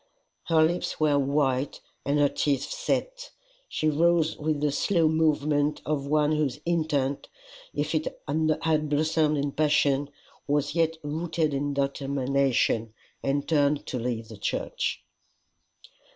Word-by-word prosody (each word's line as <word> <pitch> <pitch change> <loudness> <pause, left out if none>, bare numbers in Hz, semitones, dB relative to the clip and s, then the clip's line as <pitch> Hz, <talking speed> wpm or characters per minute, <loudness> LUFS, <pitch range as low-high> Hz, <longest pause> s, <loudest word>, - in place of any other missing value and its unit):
Her 160 -2 +4
lips 175 +3 -1
were 150 -2 +3
white, 140 -1 0 0.3
and 140 +2 +1
her 145 -1 +5
teeth 140 0 0
set. - - -2 0.4
She 155 - -1
rose 160 +1 +3
with 155 0 -1
the 150 0 +1
slow 165 +2 +2
movement 150 -2 +1
of 145 -2 -1
one 150 0 +2
whose 150 -4 0
intent, 150 -5 0 0.4
if 150 +2 -2
it 155 -1 0 0.2
had 155 +1 +1
blossomed 155 0 +2
in 140 0 -1
passion, 145 -2 +2 0.4
was 145 0 0
yet 165 -1 +1
rooted 160 +1 -1
in 140 +1 -1
determination, 135 -4 0 0.3
and 140 +1 -1
turned 145 -2 +2
to 125 - -3
leave 115 -2 -3
the 110 - -10
church. 100 - -2
150 Hz, 130 wpm, -27 LUFS, 140-155 Hz, 0.4 s, her